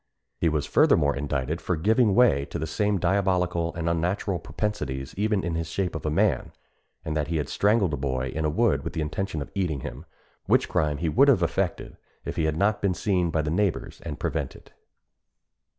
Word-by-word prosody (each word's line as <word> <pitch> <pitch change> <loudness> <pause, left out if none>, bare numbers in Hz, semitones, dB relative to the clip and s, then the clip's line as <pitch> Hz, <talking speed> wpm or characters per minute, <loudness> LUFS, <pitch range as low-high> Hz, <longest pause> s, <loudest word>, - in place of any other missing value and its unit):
He 85 - +3
was 75 -2 -1
furthermore 70 -2 +3
indicted 70 +3 -2
for 90 - -1
giving 105 +5 +3
way 70 - +4
to - - -6
the 80 - -2
same 105 +6 0
diabolical 90 -3 +1
and 85 0 -3
unnatural 85 +3 0
propensities 75 -6 -4
even 105 0 0
in 85 0 -2
his 80 -1 -2
shape 90 +1 -2
of 80 -1 -4
a - - +2
man; 85 -2 +1 0.5
and 75 - -2
that 75 -2 0
he 80 0 -1
had 75 - -2
strangled 100 -5 +2
a - - -1
boy 65 -1 -2
in 80 - -3
a 75 - +2
wood 85 -5 +1
with - - -5
the 80 - -2
intention 80 +1 -3
of - - -14
eating 85 -8 -1
him, - - -7 0.4
which - - +3
crime 75 -1 0
he 85 +3 -2
would 130 - +4
have 115 -11 +4
effected 85 +1 -2 0.3
if - - -4
he 80 - 0
had 80 0 0
not 105 +3 +1
been 95 -3 +1
seen 90 -4 +1
by 80 -1 0
the 75 - -2
neighbours 95 0 -1
and 75 -2 -6
prevented. 75 -5 -4
85 Hz, 205 wpm, -26 LUFS, 75-100 Hz, 0.5 s, way